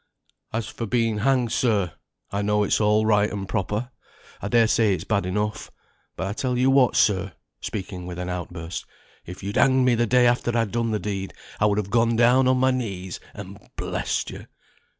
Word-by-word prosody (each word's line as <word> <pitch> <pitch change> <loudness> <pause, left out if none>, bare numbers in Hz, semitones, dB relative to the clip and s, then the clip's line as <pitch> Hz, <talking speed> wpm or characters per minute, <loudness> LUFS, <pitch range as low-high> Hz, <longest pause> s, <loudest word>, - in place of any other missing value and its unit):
"As 110 -1 -2
for 110 +1 -5
being 115 -1 +1
hanged, 125 -1 +2
sir, 105 -9 +1 0.4
I 100 - -1
know 105 0 +2
it's 105 - +1
all 105 +1 +3
right 105 -1 +3
and 100 -2 -4
proper. 105 +6 -2 0.5
I - - -3
dare 115 +1 +4
say 110 -3 +3
it's - - -6
bad 100 -4 0
enough; 105 +3 -2 0.5
but - - -3
I 100 - -2
tell 125 +2 -1
you 130 +2 +3
what, 135 -2 +4
sir," 100 -3 +2 0.3
speaking 95 -3 -5
with 90 -1 -6
an 90 0 -4
out 90 -2 -4
burst, 85 -1 -6 0.4
"if 90 +2 -9
you'd 100 +1 -3
hanged 130 -1 +4
me 125 - +4
the 120 0 +1
day 125 +2 +4
after 120 0 +2
I'd 115 -3 0
done 115 -1 0
the 110 - 0
deed, 95 -2 -4 0.2
I 105 - +4
would 100 -1 +1
have 100 -2 -2
gone 115 0 +3
down 125 +3 +4
on 130 0 +3
my 130 +1 +3
knees 95 -8 -4 0.2
and 100 0 -9 0.2
blessed - - -2
you. - - -10
105 Hz, 205 wpm, -24 LUFS, 100-120 Hz, 0.5 s, dare